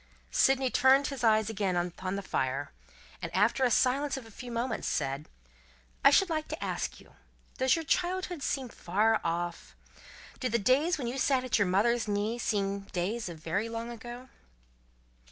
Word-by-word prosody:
Sydney 265 Hz, -, +3 dB
turned 265 Hz, +2 st, +5 dB
his 270 Hz, -4 st, -4 dB
eyes 220 Hz, -2 st, +4 dB
again 200 Hz, -4 st, -1 dB
upon 180 Hz, +2 st, -2 dB
the 200 Hz, -, -4 dB
fire, 135 Hz, -5 st, -2 dB, 0.5 s
and, -, -, -4 dB
after 215 Hz, +7 st, +3 dB
a 250 Hz, -, +4 dB
silence 270 Hz, +4 st, +2 dB
of 260 Hz, -, -8 dB
a 225 Hz, -, -14 dB
few 245 Hz, +3 st, -9 dB
moments, 235 Hz, 0 st, -2 dB
said: 140 Hz, +1 st, -2 dB, 0.7 s
"I -, -, +9 dB
should 390 Hz, -, +5 dB
like 310 Hz, -2 st, -2 dB
to -, -, -5 dB
ask -, -, -3 dB
you: -, -, -19 dB, 0.5 s
Does 260 Hz, 0 st, +4 dB
your 325 Hz, -1 st, -4 dB
childhood 360 Hz, 0 st, -1 dB
seem 265 Hz, -2 st, -2 dB
far 215 Hz, +4 st, +1 dB
off? 170 Hz, -, -3 dB, 0.6 s
Do 255 Hz, -, -1 dB
the 235 Hz, -, +2 dB
days 275 Hz, -, +2 dB
when 265 Hz, -, -4 dB
you 245 Hz, +3 st, -3 dB
sat 265 Hz, -1 st, +2 dB
at 250 Hz, -3 st, +1 dB
your 200 Hz, -, +3 dB
mother's 225 Hz, +5 st, +2 dB
knee, 210 Hz, +3 st, -1 dB
seem 200 Hz, -3 st, 0 dB
days 195 Hz, +3 st, -3 dB
of 170 Hz, -, -8 dB
very 185 Hz, +8 st, -2 dB
long 230 Hz, +1 st, -5 dB
ago?" 240 Hz, +2 st, -9 dB
230 Hz, 175 wpm, -30 LUFS, 195-260 Hz, 0.7 s, I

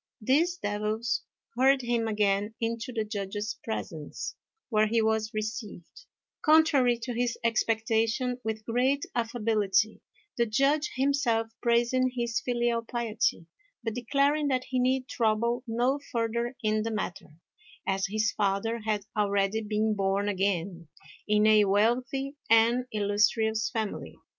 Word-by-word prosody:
These 310 Hz, +10 st, +2 dB
devils 215 Hz, 0 st, -1 dB, 0.3 s
hurried 265 Hz, +1 st, +4 dB
him 235 Hz, -1 st, 0 dB
again 210 Hz, 0 st, 0 dB
into 230 Hz, +1 st, -2 dB
the 225 Hz, -3 st, -1 dB
Judge's 210 Hz, +1 st, -4 dB
presence, 165 Hz, -8 st, -5 dB, 0.3 s
where 215 Hz, -2 st, +3 dB
he 230 Hz, +2 st, +1 dB
was 220 Hz, 0 st, +1 dB
received, 215 Hz, -, -6 dB, 0.4 s
contrary 300 Hz, -6 st, +4 dB
to 245 Hz, -, -3 dB
his 240 Hz, 0 st, -1 dB
expectation, 225 Hz, +2 st, +1 dB
with 220 Hz, -1 st, -4 dB
great 260 Hz, +4 st, +1 dB
affability; 220 Hz, -3 st, 0 dB, 0.4 s
the 235 Hz, -, +3 dB
Judge 275 Hz, +7 st, +2 dB
himself 260 Hz, -4 st, +1 dB
praising 240 Hz, +2 st, +2 dB
his 235 Hz, -1 st, -1 dB
filial 240 Hz, -1 st, 0 dB
piety, 230 Hz, -7 st, -1 dB, 0.4 s
but 225 Hz, -1 st, -2 dB
declaring 280 Hz, +5 st, +1 dB
that 255 Hz, -2 st, 0 dB
he 255 Hz, -1 st, 0 dB
need 255 Hz, +1 st, +1 dB
trouble 235 Hz, +1 st, 0 dB
no 245 Hz, +5 st, +1 dB
further 235 Hz, +1 st, -1 dB
in 215 Hz, 0 st, +1 dB
the 225 Hz, -, -2 dB
matter, 185 Hz, -7 st, -5 dB, 0.5 s
as 195 Hz, 0 st, 0 dB
his 215 Hz, +2 st, 0 dB
father 205 Hz, +3 st, 0 dB
had 215 Hz, -2 st, -2 dB
already 200 Hz, 0 st, +1 dB
been 215 Hz, 0 st, 0 dB
born 195 Hz, 0 st, 0 dB
again 190 Hz, -3 st, -1 dB, 0.4 s
in 210 Hz, 0 st, +3 dB
a 215 Hz, -1 st, +6 dB
wealthy 250 Hz, +7 st, +1 dB
and 230 Hz, +2 st, +4 dB
illustrious 215 Hz, +1 st, +1 dB
family. 220 Hz, -3 st, -4 dB
225 Hz, 130 wpm, -28 LUFS, 210-245 Hz, 0.5 s, a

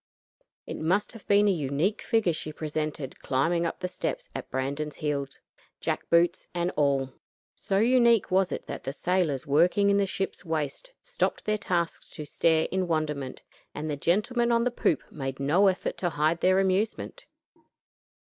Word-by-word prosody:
It -, -, -6 dB
must 185 Hz, +6 st, 0 dB
have 225 Hz, -3 st, -13 dB
been 205 Hz, +1 st, +5 dB
a -, -, +5 dB
unique 155 Hz, +4 st, 0 dB
figure 225 Hz, -7 st, +2 dB
she 155 Hz, -1 st, -5 dB
presented 150 Hz, -3 st, -4 dB
climbing 170 Hz, +6 st, +1 dB
up 165 Hz, -, -6 dB
the 180 Hz, -, -1 dB
steps -, -, -4 dB
at -, -, -6 dB
Brandon's 140 Hz, +3 st, -3 dB
heels, 140 Hz, -3 st, -3 dB, 0.4 s
jack -, -, -3 dB
boots 170 Hz, +2 st, +3 dB
and 175 Hz, +1 st, 0 dB
all. 135 Hz, -3 st, +1 dB, 0.4 s
So 195 Hz, -3 st, -2 dB
unique 235 Hz, -1 st, +4 dB
was 190 Hz, 0 st, +3 dB
it -, -, -4 dB
that -, -, -6 dB
the 135 Hz, -, -4 dB
sailors 170 Hz, -5 st, 0 dB
working 175 Hz, +8 st, +4 dB
in 200 Hz, -, +3 dB
the 200 Hz, -1 st, +2 dB
ship's 195 Hz, 0 st, -3 dB
waist 160 Hz, -, -3 dB
stopped -, -, -2 dB
their 215 Hz, 0 st, 0 dB
tasks 175 Hz, -4 st, -2 dB
to 150 Hz, -, -6 dB
stare 160 Hz, +2 st, +2 dB
in 185 Hz, 0 st, 0 dB
wonderment, 150 Hz, -5 st, -2 dB, 0.3 s
and 155 Hz, +1 st, -3 dB
the -, -, -1 dB
gentlemen 225 Hz, -, +1 dB
on 235 Hz, 0 st, +3 dB
the 250 Hz, -, +1 dB
poop 170 Hz, -, +1 dB
made 135 Hz, -2 st, -5 dB
no 165 Hz, +9 st, +4 dB
effort 185 Hz, -1 st, -1 dB
to 175 Hz, -, 0 dB
hide 155 Hz, +2 st, 0 dB
their 185 Hz, +1 st, +4 dB
amusement. 200 Hz, -, -1 dB
170 Hz, 170 wpm, -27 LUFS, 150-200 Hz, 0.4 s, been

